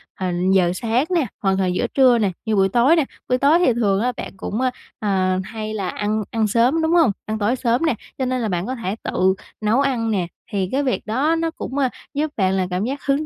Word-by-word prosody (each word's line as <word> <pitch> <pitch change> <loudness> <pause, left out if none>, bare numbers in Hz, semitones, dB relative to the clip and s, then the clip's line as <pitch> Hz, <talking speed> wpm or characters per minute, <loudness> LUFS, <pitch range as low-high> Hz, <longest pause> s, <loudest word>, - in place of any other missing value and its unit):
ờ, 185 -1 -2 0.2
giờ 180 -2 +4
sáng 230 +6 0
nè, 325 -5 +2 0.2
hoặc 195 -1 +2
là 190 - +2
giữa 180 0 0
trưa 255 -3 +4
nè, 205 -4 +1
như 220 - +1
buổi 195 -1 +3
tối 250 - +4
nè. 320 - +3 0.3
Buổi 250 - +3
tối 290 +6 +4
thì 260 -9 +3
thường 205 -4 +1
á 250 +2 +1
bạn - - -6
cũng, 215 +6 -3
ơ, 255 - +2 0.3
ờ, 185 -3 +1
hay 215 +1 -6
là 200 -3 -2
ăn 210 +1 -1
ăn 220 -2 +1
sớm, 245 +9 +2
đúng 320 0 +1
hông? 325 -11 +5
Ăn 215 0 -3
tối 215 +4 +1
sớm 245 +4 +1
nè, 310 - +2 0.2
cho 260 - -1
nên 255 0 -1
là 225 - -1
bạn 175 0 -1
có 255 - -3
thể 215 -4 -3
tự 190 +1 +2 0.3
nấu 215 +4 +2
ăn 240 -5 0
nè, 185 -4 0 0.2
thì 190 -2 -1
cái 280 +2 +1
việc 255 - -1
đó 275 +9 +1
nó 330 0 -1
cũng, 275 -4 -6
ờ, 270 -2 +2 0.2
giúp 300 +1 -1
bạn 190 -2 +2
là 190 -1 0
cảm 180 +3 -1
giác 275 +3 -4
hứng 285 +2 +1
230 Hz, 255 wpm, -21 LUFS, 195-265 Hz, 0.3 s, hông